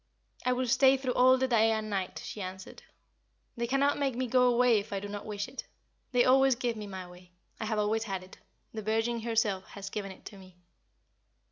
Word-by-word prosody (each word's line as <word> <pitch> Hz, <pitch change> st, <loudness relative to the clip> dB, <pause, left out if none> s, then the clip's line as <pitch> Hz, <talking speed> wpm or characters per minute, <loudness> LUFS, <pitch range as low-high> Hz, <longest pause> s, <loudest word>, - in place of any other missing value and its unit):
"I 250 Hz, -, +2 dB
will 255 Hz, +1 st, -1 dB
stay 265 Hz, +2 st, +5 dB
through 255 Hz, -1 st, -2 dB
all 255 Hz, +1 st, +5 dB
the 260 Hz, 0 st, +1 dB
day 225 Hz, -3 st, +4 dB
and 220 Hz, -1 st, -1 dB
night," 195 Hz, -3 st, -3 dB
she 210 Hz, -, -6 dB
answered. 185 Hz, 0 st, -8 dB, 0.7 s
"They 235 Hz, -1 st, -2 dB
cannot 280 Hz, +3 st, +2 dB
make 275 Hz, -3 st, 0 dB
me 255 Hz, +1 st, -1 dB
go 250 Hz, 0 st, +4 dB
away 240 Hz, -2 st, +4 dB
if 200 Hz, +2 st, -9 dB
I 200 Hz, -, -2 dB
do 205 Hz, -, -6 dB
not 205 Hz, +1 st, -7 dB
wish 205 Hz, -1 st, -3 dB
it. 260 Hz, +1 st, -8 dB, 0.4 s
They 245 Hz, -1 st, +4 dB
always 265 Hz, 0 st, +5 dB
give 240 Hz, -1 st, -2 dB
me 210 Hz, -1 st, -7 dB
my 190 Hz, -2 st, -7 dB
way. 180 Hz, 0 st, -16 dB, 0.3 s
I 220 Hz, -, -3 dB
have 215 Hz, 0 st, -1 dB
always 215 Hz, +2 st, 0 dB
had 190 Hz, -3 st, -4 dB
it 185 Hz, -, -15 dB, 0.3 s
the 220 Hz, -, -4 dB
Virgin 225 Hz, +2 st, 0 dB
herself 220 Hz, -4 st, 0 dB
has 200 Hz, -1 st, -9 dB
given 200 Hz, -2 st, -4 dB
it 190 Hz, -, -15 dB
to 200 Hz, -, -10 dB
me." 185 Hz, -2 st, -16 dB
225 Hz, 220 wpm, -30 LUFS, 200-250 Hz, 0.7 s, stay